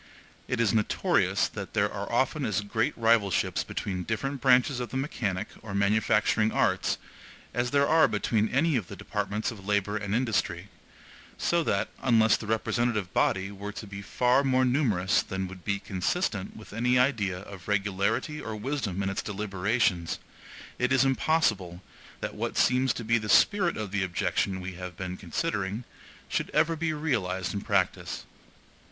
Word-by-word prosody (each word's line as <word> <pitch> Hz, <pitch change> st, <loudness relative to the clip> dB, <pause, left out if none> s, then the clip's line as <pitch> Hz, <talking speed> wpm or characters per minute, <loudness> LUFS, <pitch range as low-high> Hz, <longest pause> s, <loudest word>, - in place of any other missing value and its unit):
It 130 Hz, -, -1 dB
is 115 Hz, -4 st, +3 dB
notorious 110 Hz, -2 st, +2 dB
that -, -, -7 dB
there -, -, +2 dB
are -, -, -5 dB
often -, -, +1 dB
as -, -, 0 dB
great 110 Hz, +7 st, -1 dB
rivalships 110 Hz, -5 st, +2 dB
between 95 Hz, -3 st, -4 dB
different 120 Hz, +8 st, -3 dB
branches 130 Hz, 0 st, +4 dB
of 125 Hz, -, -4 dB
the 130 Hz, -, -3 dB
mechanic 105 Hz, -9 st, -2 dB
or 100 Hz, -2 st, -6 dB
manufacturing 105 Hz, +1 st, +2 dB
arts -, -, +1 dB, 0.6 s
as 120 Hz, 0 st, 0 dB
there 140 Hz, +2 st, +3 dB
are 160 Hz, +1 st, +5 dB
between 105 Hz, +1 st, 0 dB
any 150 Hz, +4 st, +2 dB
of 100 Hz, -7 st, -3 dB
the -, -, -8 dB
departments 105 Hz, +1 st, -2 dB
of 105 Hz, -4 st, -10 dB
labor 105 Hz, 0 st, +1 dB
and 100 Hz, 0 st, -2 dB
industry; 100 Hz, -6 st, -1 dB, 0.7 s
so 170 Hz, -1 st, +1 dB
that, -, -, +1 dB
unless 115 Hz, -4 st, +4 dB
the 110 Hz, -, -6 dB
representative 110 Hz, -2 st, 0 dB
body 95 Hz, +1 st, +1 dB
were 100 Hz, +1 st, -6 dB
to 110 Hz, -, -7 dB
be 100 Hz, -1 st, -8 dB
far 125 Hz, +6 st, +2 dB
more 130 Hz, -1 st, +3 dB
numerous 110 Hz, -8 st, +2 dB
than 95 Hz, -1 st, -4 dB
would 90 Hz, -1 st, -11 dB
be 100 Hz, -1 st, 0 dB
consistent 100 Hz, -, -2 dB
with 110 Hz, -2 st, -12 dB
any 125 Hz, +3 st, +2 dB
idea 115 Hz, -8 st, +2 dB
of 95 Hz, -1 st, -11 dB
regularity 100 Hz, +8 st, 0 dB
or 110 Hz, -1 st, -5 dB
wisdom 105 Hz, -5 st, -2 dB
in 95 Hz, -, 0 dB
its 95 Hz, -, -2 dB
deliberations, 100 Hz, -3 st, 0 dB, 0.6 s
it 125 Hz, +1 st, +1 dB
is 130 Hz, 0 st, +4 dB
impossible 115 Hz, -, +1 dB, 0.4 s
that -, -, -3 dB
what -, -, -3 dB
seems 130 Hz, +1 st, +3 dB
to 120 Hz, -, -4 dB
be 115 Hz, +1 st, +2 dB
the 105 Hz, 0 st, -6 dB
spirit 190 Hz, -, +4 dB
of 105 Hz, -3 st, -4 dB
the 100 Hz, -1 st, 0 dB
objection 95 Hz, +1 st, -1 dB
we 95 Hz, +1 st, -5 dB
have 90 Hz, -1 st, -8 dB
been 90 Hz, -1 st, -4 dB
considering 100 Hz, -, -2 dB, 0.4 s
should -, -, -2 dB
ever 160 Hz, +2 st, +3 dB
be 160 Hz, 0 st, -1 dB
realized 110 Hz, -, -1 dB
in 100 Hz, -, -3 dB
practice. -, -, -1 dB
110 Hz, 165 wpm, -28 LUFS, 95-125 Hz, 0.7 s, are